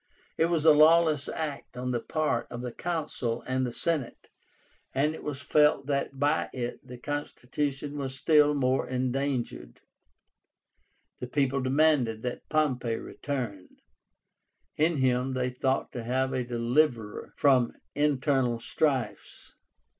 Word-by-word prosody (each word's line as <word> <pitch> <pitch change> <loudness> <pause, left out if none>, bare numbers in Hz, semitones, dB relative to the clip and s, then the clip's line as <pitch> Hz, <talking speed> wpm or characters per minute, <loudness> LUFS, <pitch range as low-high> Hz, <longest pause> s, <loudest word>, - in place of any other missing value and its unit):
It 165 - +2
was 165 -2 0
a 160 - +9
lawless 155 -1 +5
act 150 -5 -5
on 125 0 -2
the 120 - 0
part 155 +5 -1
of 120 - -6
the 125 -1 -4
Consul 145 -8 -3
and 130 0 0
the - - -4
Senate, 150 -1 -2 0.7
and 150 +3 +2
it - - -9
was 140 -2 -5
felt 150 -1 +3
that 140 -1 -2
by 145 +3 +1
it 120 -1 -4
the 125 -1 -10
constitution 145 +1 -4
was 135 -1 -3
still 150 +1 +4
more 130 -1 +1
endangered. 130 - -2 1.4
The 125 - -5
people 135 0 0
demanded 130 -4 +2
that 125 -1 -5
Pompey 130 -7 +1
return. 115 -9 -5 1.1
In 160 +1 +2
him 130 0 +1
they 125 0 -1
thought 130 +1 -1
to 120 - -5
have 130 +3 0
a 130 - 0
deliverer 120 -1 0
from 130 -4 +3 0.2
internal 135 -4 +1
strifes. 135 0 -2
135 Hz, 130 wpm, -28 LUFS, 125-150 Hz, 1.4 s, a